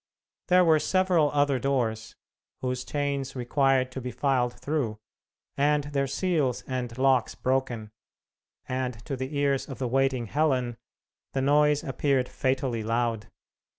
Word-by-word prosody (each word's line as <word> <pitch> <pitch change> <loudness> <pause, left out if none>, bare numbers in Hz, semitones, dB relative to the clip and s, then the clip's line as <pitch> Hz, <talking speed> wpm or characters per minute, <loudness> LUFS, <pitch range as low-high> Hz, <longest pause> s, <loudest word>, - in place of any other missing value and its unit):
There 180 -1 +5
were 160 -2 +5
several 180 -2 +2
other 145 -2 +2
doors, 115 -4 -1 0.5
whose 125 0 -2
chains 140 -2 -2
required 130 0 +1
to 130 - -6
be 125 - -4
filed 125 -2 0
through, 140 -8 -2 0.6
and 145 +1 +2
their 140 -1 -1
seals 150 -4 0
and 125 -2 -4
locks 130 -2 +2
broken, 125 -5 -1 0.8
and 130 -1 -2
to 140 - -3
the 130 +3 -4
ears 140 -1 +1
of 135 - -6
the 130 - -2
waiting 135 -1 +1
Helen 130 -3 0 0.6
the 135 - 0
noise 150 +1 +3
appeared 135 -1 0
fatally 130 -3 -1
loud. 115 -1 -1
135 Hz, 135 wpm, -27 LUFS, 125-145 Hz, 0.8 s, There